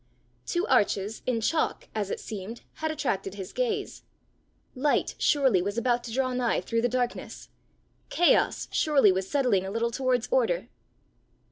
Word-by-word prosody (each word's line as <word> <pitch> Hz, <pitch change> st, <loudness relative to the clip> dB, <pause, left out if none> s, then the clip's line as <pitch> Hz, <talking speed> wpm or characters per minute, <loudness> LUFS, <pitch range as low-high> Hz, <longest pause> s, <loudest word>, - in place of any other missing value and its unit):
Two 345 Hz, +1 st, 0 dB
arches, 210 Hz, -4 st, +1 dB
in 235 Hz, -3 st, 0 dB
chalk, 315 Hz, +8 st, 0 dB
as 210 Hz, -3 st, -2 dB
it -, -, -3 dB
seemed, 215 Hz, +2 st, -7 dB, 0.2 s
had 315 Hz, -, 0 dB
attracted 225 Hz, -11 st, -2 dB
his 195 Hz, -1 st, -7 dB
gaze. 440 Hz, -5 st, -2 dB, 0.7 s
Light 285 Hz, +3 st, +1 dB
surely 265 Hz, -10 st, +3 dB
was 200 Hz, +4 st, -3 dB
about 240 Hz, 0 st, +1 dB
to 235 Hz, -, -6 dB
draw 255 Hz, +1 st, 0 dB
nigh 250 Hz, -2 st, +1 dB
through 230 Hz, 0 st, -1 dB
the 245 Hz, -, +1 dB
darkness! 245 Hz, 0 st, -3 dB, 0.6 s
Chaos 350 Hz, -, +3 dB
surely 280 Hz, -10 st, +4 dB
was 190 Hz, 0 st, -2 dB
settling 250 Hz, -10 st, +2 dB
a 190 Hz, -, -4 dB
little 230 Hz, +3 st, -1 dB
towards 255 Hz, -1 st, 0 dB
order! -, -, +1 dB
245 Hz, 150 wpm, -27 LUFS, 205-280 Hz, 0.7 s, surely